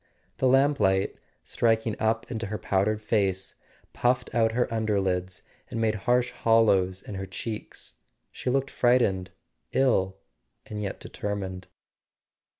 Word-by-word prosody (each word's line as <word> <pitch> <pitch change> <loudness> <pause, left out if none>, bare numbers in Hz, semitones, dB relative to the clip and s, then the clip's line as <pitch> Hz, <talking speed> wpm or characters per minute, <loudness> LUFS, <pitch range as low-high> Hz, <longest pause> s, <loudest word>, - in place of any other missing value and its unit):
The 130 - +2
lamplight, 130 -8 +3 0.3
striking 115 -1 +1
up 110 0 0
into 115 -2 -3
her 105 +1 -3
powdered 105 +3 0
face, 95 -4 0 0.4
puffed 125 +1 0
out 115 -1 +3
her 125 +1 +2
underlids 95 -5 -1 0.3
and 115 - -4
made 110 -1 +2
harsh 120 +4 +1
hollows 100 -5 +3
in - - -8
her 95 0 -5
cheeks. 95 - -6 0.3
She - - -4
looked 135 +1 0
frightened, 110 -7 +2 0.4
ill 95 -8 +2 0.5
and 105 -1 -5
yet 100 -2 -4
determined. 95 -3 -5
110 Hz, 125 wpm, -27 LUFS, 95-115 Hz, 0.5 s, lamplight